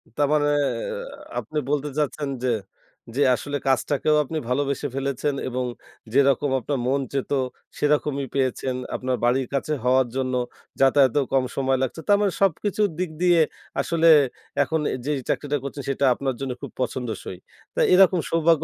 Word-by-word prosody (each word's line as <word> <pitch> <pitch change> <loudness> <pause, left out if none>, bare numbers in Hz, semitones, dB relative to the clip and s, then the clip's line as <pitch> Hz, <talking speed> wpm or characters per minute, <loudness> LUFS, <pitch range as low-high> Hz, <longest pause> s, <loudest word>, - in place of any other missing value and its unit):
তারমানে 145 0 +2 0.9
আপনি 155 - -6
বলতে 150 0 0
চাচ্ছেন 145 -1 -1
যে 125 - +2 0.6
যে 145 - +3
আসলে 145 +4 -4
কাজটাকেও 145 +3 +2
আপনি 155 +3 -5
ভালোবেসে 140 +2 0
ফেলেছেন 140 +1 -1
এবং 125 0 -2 0.5
যেরকম 140 0 +3
আপনার 135 +2 -2
মন 135 +1 +1
চেয়েছিল, 140 0 0 0.4
সেরকমই 145 -2 +1
পেয়েছেন। 130 -1 0 0.2
আপনার 130 0 -1
বাড়ির 125 +1 +2
কাছে 140 +3 -1
হওয়ার 130 0 +3
জন্য 130 -1 -1 0.5
যাতায়াতেও 135 0 +4
কম 135 - +4
সময় 135 -1 +2
লাগছে। 145 +5 -3
তার 205 0 +6
মানে 200 -2 +2
সবকিছুর 200 +2 +2
দিক 185 - -1
দিয়ে 175 -2 +5 0.4
আসলে 165 0 +2 0.6
এখন 160 +3 -1
এ - - -1
যেই 150 -1 0
চাকরিটা 145 0 0
করছেন, 140 0 -6
সেটা 140 +1 +1
আপনার 135 0 -2
জন্য 135 -1 -3
খুব - - -7
পছন্দসই। 115 -7 -4 0.4
তো - - -2
এরকম 185 -1 +6
সৌভাগ্য 165 -1 +3
140 Hz, 150 wpm, -24 LUFS, 130-150 Hz, 0.9 s, তার